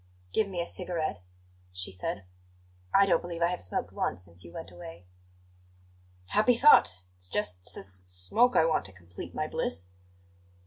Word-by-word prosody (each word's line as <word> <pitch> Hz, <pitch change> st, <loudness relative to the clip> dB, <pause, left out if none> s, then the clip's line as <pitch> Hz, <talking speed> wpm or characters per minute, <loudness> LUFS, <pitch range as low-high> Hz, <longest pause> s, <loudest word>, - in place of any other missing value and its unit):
"Give 215 Hz, -, +2 dB
me 185 Hz, -3 st, -4 dB
a 170 Hz, -, 0 dB
cigarette," 175 Hz, -, -2 dB, 0.5 s
she 90 Hz, 0 st, -4 dB
said. 95 Hz, +1 st, -3 dB, 0.7 s
"I 195 Hz, -, +6 dB
don't 175 Hz, -4 st, +3 dB
believe 170 Hz, -1 st, -3 dB
I 170 Hz, -, +4 dB
have 180 Hz, -, -3 dB
smoked 90 Hz, -, -1 dB
once 90 Hz, -, -1 dB
since 85 Hz, 0 st, -10 dB
you 85 Hz, -, -11 dB
went 90 Hz, -, -8 dB
away." 85 Hz, 0 st, -10 dB, 1.2 s
"Happy 230 Hz, -, +4 dB
thought! 95 Hz, -, +6 dB
It's 90 Hz, 0 st, -8 dB
just 90 Hz, -2 st, -1 dB
s -, -, -4 dB
s 95 Hz, -, -5 dB, 0.2 s
smoke 200 Hz, -, +2 dB
I 160 Hz, -, +6 dB
want 165 Hz, -, +2 dB
to 95 Hz, -, -4 dB
complete 90 Hz, 0 st, -10 dB
my -, -, 0 dB
bliss." 90 Hz, +2 st, -1 dB
95 Hz, 170 wpm, -30 LUFS, -, 1.2 s, I